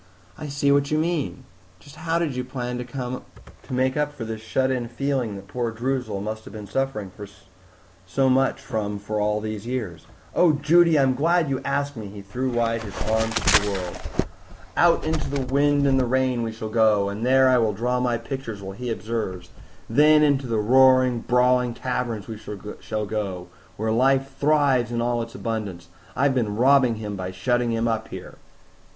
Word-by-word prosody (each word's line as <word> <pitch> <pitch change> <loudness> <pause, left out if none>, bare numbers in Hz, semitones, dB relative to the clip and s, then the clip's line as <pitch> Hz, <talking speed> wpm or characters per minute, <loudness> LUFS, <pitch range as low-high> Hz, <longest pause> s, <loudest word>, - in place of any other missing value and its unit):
"I 155 - -7
see 140 0 +1
what 140 0 +3
you 155 - +1
mean. 155 -5 -1 0.4
Just 145 - -15
how 165 0 -1
did 165 -6 -1
you 125 - -2
plan 125 -1 -4
to 125 0 -5 0.5
make 130 0 +1
up 150 0 0
for 130 -6 -7
this 110 -1 -5
shut 130 +5 0
in 125 -2 -2
feeling 125 -3 -2
that 100 0 -10
poor 120 +2 -2
Droozle 120 -3 -2
must 110 +1 -5
have - - -11
been 105 -2 -7
suffering 105 -3 -2 1.0
so 135 +8 +1
much 135 +1 +2
from 110 -6 -3
for 105 +1 -3
all 105 0 +1
these 110 0 -5
years?" 110 -10 -4 0.3
"Oh, 175 -3 +4
Judy, 165 +2 +4
I'm 135 -2 +3
so - - -8
glad 165 0 +2
you 135 - -1
asked 140 +1 -1
me!" 110 -3 -7
He 100 0 -10
threw 125 +7 -3
wide 115 -2 0
his 105 -3 -7
arms 110 0 +1
to - - +5
the 105 - -1
world. 90 -3 -4 0.8
"Out 170 -1 +4
into 160 -1 -1
the 140 -1 -1
wind 145 0 +3
and 135 -1 +3
the 130 - +2
rain 130 -1 +1
we 115 -1 -2
shall 110 0 -6
go, 110 -3 +3
and 100 +3 -4
there 130 +1 +5
I 130 -1 +5
will 110 -2 +2
draw 125 +4 -1
my 125 -1 +1
pictures 115 -3 -6
while 95 0 -7
he 125 +4 -5
observes; 110 -6 -4 0.4
then 150 +5 +5
into 140 -3 +2
the 115 -2 0
roaring, 130 +2 +5
brawling 125 0 +2
taverns 120 -5 -3
we 110 -2 -7 0.4
shall 110 -1 -3
go, 95 -4 -4 0.3
where 110 +1 -1
life 135 +3 +2
thrives 140 -5 +3
in 120 - -1
all 120 0 0
its 115 0 -7
abundance. 100 -7 -4 0.3
I've 140 +1 +2
been 110 -5 -1
robbing 130 0 +4
him 105 -2 -5
by 95 -1 -4
shutting 120 +6 0
him 115 0 0
up 115 -1 -1
here." - - -10
125 Hz, 195 wpm, -24 LUFS, 110-135 Hz, 1.0 s, to